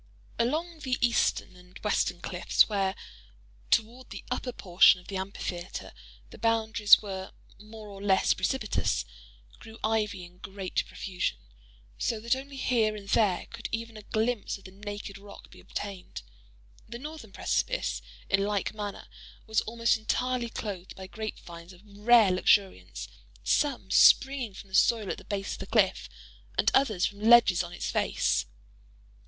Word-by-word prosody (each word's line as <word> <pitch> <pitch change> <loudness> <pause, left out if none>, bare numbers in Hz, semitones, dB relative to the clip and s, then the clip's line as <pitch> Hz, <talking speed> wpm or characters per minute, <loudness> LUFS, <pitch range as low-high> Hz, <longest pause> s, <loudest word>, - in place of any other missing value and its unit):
Along 315 +7 -1
the 260 -4 -1
eastern 235 -5 +1
and 180 +1 -15
western 180 -4 0
cliffs—where, 195 +1 +1 0.7
toward 240 +4 0
the - - -8
upper 250 0 -2
portion 185 -4 +5
of 180 - -17
the 200 - -5
amphitheatre, 190 -2 -5 0.4
the - - -12
boundaries 225 -2 +4
were 190 -2 -6 0.3
more 215 0 -11
or 200 -1 -10
less 195 -2 +3
precipitous—grew - - -4
ivy 215 -4 0
in 175 +1 -18
great 195 -1 -3
profusion—so - - -5
that 235 +3 +1
only 275 +1 -8
here 230 -5 +1
and 200 -1 -10
there 205 -6 +2
could 230 0 -6
even 230 0 -4
a 215 - -9
glimpse 220 +1 -1
of 195 - -20
the 185 - -11
naked 205 0 -7
rock 200 0 -13
be - - -15
obtained. 195 -3 -7 0.7
The 235 - -6
northern 290 -5 -9
precipice, 190 - -1 0.3
in 195 +1 +2
like 205 -1 -1
manner, 205 -2 -6 0.4
was 220 -1 +1
almost 230 +1 +1
entirely 245 +2 -1
clothed 195 -5 -6
by 190 - -8
grape 215 +3 -6
vines 170 +1 -11
of 180 - -17
rare 210 0 +4
luxuriance; 185 - +1 0.4
some 245 - 0
springing 265 -7 +5
from 195 - -11
the - - -19
soil 220 -4 +3
at - - -5
the - - -13
base 200 -1 -3
of - - -8
the - - -7
cliff, - - +2 0.5
and - - +3
others 215 -9 +3
from 200 - -4
ledges 220 -5 +6
on 175 -1 -6
its 175 - -4
face. - - +1
205 Hz, 150 wpm, -28 LUFS, 185-230 Hz, 0.7 s, ledges